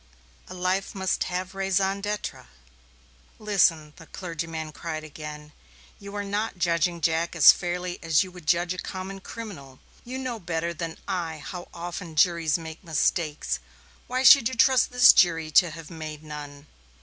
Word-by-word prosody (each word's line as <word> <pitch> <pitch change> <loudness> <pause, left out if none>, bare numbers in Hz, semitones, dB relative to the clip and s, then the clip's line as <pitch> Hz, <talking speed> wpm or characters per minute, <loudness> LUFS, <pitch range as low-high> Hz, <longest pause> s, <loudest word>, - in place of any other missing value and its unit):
A 185 - -9
life 185 +2 -1
must 190 -1 0
have 180 +1 -4
a - - -13
raison 195 +1 +1
d'être." 210 - -4 0.9
"Listen," 170 -8 +2
the 165 -2 -14
clergyman 165 -3 -5
cried 155 0 -6
again. 150 0 -9 0.5
"You 200 0 -9
are 205 - -2
not 205 +1 -3
judging 170 0 0
Jack 165 +2 0
as - - +9
fairly 180 0 -4
as 165 -1 +3
you 185 - -10
would 175 -4 -13
judge 175 +1 +2
a 185 - -8
common 190 +1 -6
criminal. 180 - -9 0.2
You 255 +2 -6
know 255 -3 -4
better 170 -2 -3
than 165 -1 -5
I 170 -5 -3
how 175 +3 -8
often 170 -1 -7
juries 165 -1 +3
make 160 0 -9
mistakes 160 - 0 0.5
why 255 +1 -1
should 265 -3 +8
you 260 - -6
trust 260 0 +4
this 245 -1 +8
jury 165 -3 +3
to 175 +3 +5
have 165 0 -10
made 155 -2 -7
none?" 145 -1 -9
175 Hz, 160 wpm, -26 LUFS, 160-195 Hz, 0.9 s, as